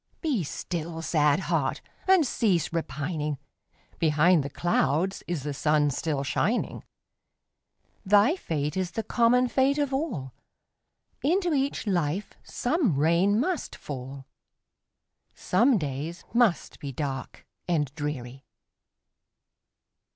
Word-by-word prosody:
Be 275 Hz, -, 0 dB
still, 165 Hz, +2 st, -5 dB
sad 150 Hz, +1 st, +2 dB
heart! -, -, 0 dB, 0.3 s
and 375 Hz, -5 st, +5 dB
cease 190 Hz, -, +1 dB
repining; 150 Hz, -2 st, -2 dB, 0.6 s
Behind 160 Hz, +2 st, +4 dB
the 140 Hz, -, -4 dB
clouds 175 Hz, +3 st, 0 dB
is 170 Hz, -6 st, -3 dB
the 145 Hz, 0 st, -3 dB
sun 150 Hz, 0 st, +2 dB
still 140 Hz, 0 st, -2 dB
shining; 205 Hz, -, -1 dB, 1.2 s
Thy 210 Hz, -, +5 dB
fate 150 Hz, -, -3 dB
is 185 Hz, -2 st, -1 dB
the 225 Hz, -, -2 dB
common 245 Hz, +2 st, +3 dB
fate 270 Hz, +3 st, +2 dB
of 285 Hz, -2 st, 0 dB
all, 225 Hz, -, -3 dB, 0.9 s
Into 350 Hz, +3 st, +1 dB
each 275 Hz, -3 st, 0 dB
life 180 Hz, 0 st, -1 dB
some 250 Hz, -, 0 dB
rain 170 Hz, +8 st, +3 dB
must 345 Hz, +6 st, -2 dB
fall, 135 Hz, -1 st, -7 dB, 1.1 s
Some 235 Hz, +6 st, +3 dB
days 150 Hz, +2 st, -4 dB
must 235 Hz, -7 st, +2 dB
be 140 Hz, -, -5 dB
dark 135 Hz, -1 st, -5 dB, 0.2 s
and 150 Hz, -6 st, 0 dB
dreary. 135 Hz, -3 st, -5 dB
170 Hz, 110 wpm, -27 LUFS, 145-235 Hz, 1.2 s, and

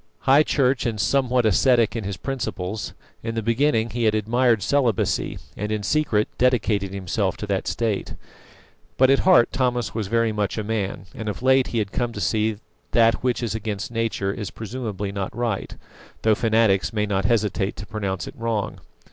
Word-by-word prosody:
High 135 Hz, +3 st, +5 dB
Church 135 Hz, -4 st, +1 dB
and 110 Hz, -2 st, -3 dB
somewhat 125 Hz, +2 st, +2 dB
ascetic 120 Hz, +2 st, +3 dB
in 110 Hz, -4 st, -3 dB
his 100 Hz, -2 st, -4 dB
principles, 105 Hz, -6 st, -4 dB, 0.3 s
in 115 Hz, 0 st, -4 dB
the 115 Hz, -, -2 dB
beginning 115 Hz, 0 st, +1 dB
he 120 Hz, 0 st, -1 dB
had 110 Hz, 0 st, +3 dB
admired 115 Hz, 0 st, +2 dB
celibacy, 125 Hz, -4 st, +1 dB, 0.2 s
and 105 Hz, +1 st, -4 dB
in 105 Hz, -1 st, -2 dB
secret 110 Hz, -4 st, +1 dB
dedicated 110 Hz, -6 st, +2 dB
himself 95 Hz, 0 st, -2 dB
to -, -, -5 dB
that 100 Hz, -2 st, -2 dB
state. 110 Hz, -4 st, -2 dB, 0.8 s
But 130 Hz, +1 st, +5 dB
at 135 Hz, -, +4 dB
heart 185 Hz, -11 st, +5 dB
Thomas 125 Hz, -2 st, 0 dB
was 110 Hz, -3 st, -3 dB
very 115 Hz, +1 st, +1 dB
much 105 Hz, 0 st, -2 dB
a 110 Hz, -, -1 dB
man, 100 Hz, -4 st, -3 dB
and 110 Hz, -1 st, -5 dB
of 105 Hz, -, -6 dB
late 130 Hz, 0 st, +4 dB
he 120 Hz, -, -3 dB
had 105 Hz, -3 st, -1 dB
come 120 Hz, -1 st, -2 dB
to 105 Hz, -, -6 dB
see 110 Hz, +1 st, +1 dB
that 105 Hz, -, -16 dB, 0.3 s
that 115 Hz, -1 st, +4 dB
which 125 Hz, -1 st, 0 dB
is 115 Hz, -, -1 dB
against 110 Hz, -1 st, -4 dB
nature 115 Hz, -4 st, -1 dB
is 105 Hz, -2 st, -5 dB
presumably 110 Hz, -3 st, -5 dB
not 100 Hz, +3 st, -4 dB
right, 115 Hz, -5 st, -2 dB, 0.5 s
though 110 Hz, -, +5 dB
fanatics 110 Hz, -3 st, +2 dB
may 105 Hz, -2 st, 0 dB
not 100 Hz, -1 st, -1 dB
hesitate 105 Hz, -3 st, 0 dB
to 105 Hz, -, -8 dB
pronounce 100 Hz, -4 st, -3 dB
it -, -, -8 dB
wrong. 115 Hz, -3 st, -2 dB
110 Hz, 185 wpm, -23 LUFS, 105-120 Hz, 0.8 s, High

